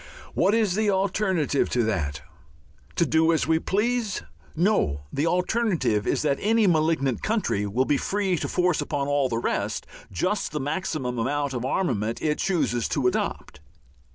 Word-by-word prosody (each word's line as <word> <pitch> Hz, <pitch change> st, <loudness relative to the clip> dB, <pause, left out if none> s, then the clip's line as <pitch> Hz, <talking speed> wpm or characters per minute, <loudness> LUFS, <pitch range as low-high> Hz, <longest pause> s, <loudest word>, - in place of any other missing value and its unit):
What 200 Hz, +3 st, +3 dB
is 215 Hz, -5 st, +2 dB
the 215 Hz, +1 st, +1 dB
alternative 190 Hz, -6 st, +1 dB
to 120 Hz, -, +1 dB
that? 80 Hz, -10 st, -2 dB, 0.7 s
To 170 Hz, -, +3 dB
do 160 Hz, +2 st, +3 dB
as 160 Hz, -, +1 dB
we 160 Hz, 0 st, +2 dB
please? 215 Hz, +2 st, -1 dB, 0.3 s
No, 160 Hz, -, +1 dB
the 145 Hz, +4 st, 0 dB
alternative 180 Hz, -, +1 dB
is -, -, +1 dB
that 140 Hz, -2 st, +1 dB
any 220 Hz, +1 st, +3 dB
malignant 155 Hz, -, +1 dB
country 210 Hz, -, 0 dB
will 120 Hz, +6 st, +1 dB
be 145 Hz, -, +2 dB
free 195 Hz, +3 st, 0 dB
to -, -, -2 dB
force 180 Hz, -2 st, +1 dB
upon 140 Hz, -2 st, -2 dB
all 145 Hz, -2 st, +1 dB
the 115 Hz, -, -1 dB
rest 105 Hz, -2 st, -2 dB, 0.3 s
just 185 Hz, -, -1 dB
the 150 Hz, -, -1 dB
maximum 145 Hz, -4 st, -2 dB
amount 140 Hz, +3 st, -1 dB
of 125 Hz, 0 st, -3 dB
armament 115 Hz, -, -1 dB
it 150 Hz, -1 st, -1 dB
chooses 155 Hz, -, 0 dB
to 140 Hz, -, -1 dB
adopt. 125 Hz, -, -1 dB
155 Hz, 160 wpm, -25 LUFS, 125-190 Hz, 0.7 s, What